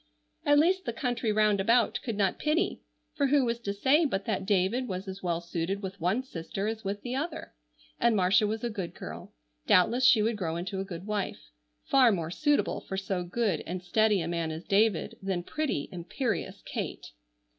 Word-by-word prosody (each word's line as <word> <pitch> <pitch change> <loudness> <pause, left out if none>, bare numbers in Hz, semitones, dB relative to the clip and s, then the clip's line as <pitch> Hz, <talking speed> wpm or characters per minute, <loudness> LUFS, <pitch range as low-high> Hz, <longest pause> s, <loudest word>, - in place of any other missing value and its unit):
At 290 0 +6
least 370 +5 +3
the 235 - -2
country 240 -2 -1
round 210 -1 +3
about 230 +4 +3
could 230 -5 -3
not 195 -3 +1
pity, 305 +3 0 0.3
for 280 - +1
who 275 -1 +3
was 235 0 -1
to 205 -4 -3
say 265 +11 +3
but 200 -10 -1
that 195 -3 -2
David 205 +6 +1
was 190 0 -4
as 190 0 -6
well 170 -2 -1
suited 170 +3 -3
with 190 -1 -6
one 190 +9 +1
sister 195 -3 -5
as 220 0 -3
with 200 +1 -4
the 250 0 -3
other? 305 +4 -4 0.5
And 235 -1 +3
Marcia 200 +3 +4
was 220 +2 -3
a 240 - 0
good 190 -5 -5
girl; - - -8 0.4
doubtless 230 +8 +4
she 225 -4 +6
would 225 0 0
grow 165 -5 -2
into 180 +3 -4
a - - -1
good 185 -1 -7
wife. 210 -2 -4 0.3
Far 260 -4 +5
more 170 -5 -2
suitable 295 - +1
for 190 - -5
so 190 -2 -2
good 195 +1 0
and 180 +1 -4
steady 210 +2 +3
a 165 - -3
man 170 -1 -1
as 160 +2 -5
David 205 -2 +1
than 190 -2 -2
pretty, 285 - -2
imperious 180 - -3
Kate. - - -5
205 Hz, 200 wpm, -29 LUFS, 185-240 Hz, 0.5 s, At